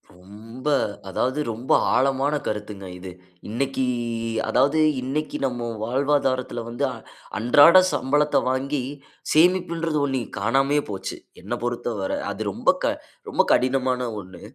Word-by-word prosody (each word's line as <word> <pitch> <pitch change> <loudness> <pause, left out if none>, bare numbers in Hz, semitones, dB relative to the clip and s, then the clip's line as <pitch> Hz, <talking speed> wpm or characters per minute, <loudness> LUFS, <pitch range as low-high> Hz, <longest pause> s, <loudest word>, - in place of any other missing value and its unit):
ரொம்ப, 110 +8 -11 0.4
அதாவது 130 +8 -1
ரொம்ப 115 +4 -5 0.2
ஆழமான 135 +2 +2
கருத்துங்க 105 -2 -5
இது. 90 0 -8 0.4
இன்னைக்கு, 130 +4 -1 0.7
அதாவது 145 +3 +3 0.2
இன்னைக்கு 145 +4 -3
நம்ம 120 -2 -2 0.2
வாழ்வாதாரத்துல 130 -1 0
வந்து, 120 +4 -4
அ, - - -5 0.4
அன்றாட 145 +10 +7 0.2
சம்பளத்த 145 +2 +2
வாங்கி 135 +2 -1 0.5
சேமிப்புன்றது 165 -1 +2
ஒண்ணு 135 -2 -1 0.2
காணாமையே 135 +7 +2
போச்சு. 95 -1 -5 0.2
என்ன - - -5
பொறுத்தவர 120 -5 -2 0.2
அது - - -5
ரொம்ப, - - 0
க - - +2 0.4
ரொம்ப - - +3
கடினமான 130 -1 +1
ஒண்ணு. 95 0 -13
130 Hz, 115 wpm, -23 LUFS, 115-145 Hz, 0.7 s, அன்றாட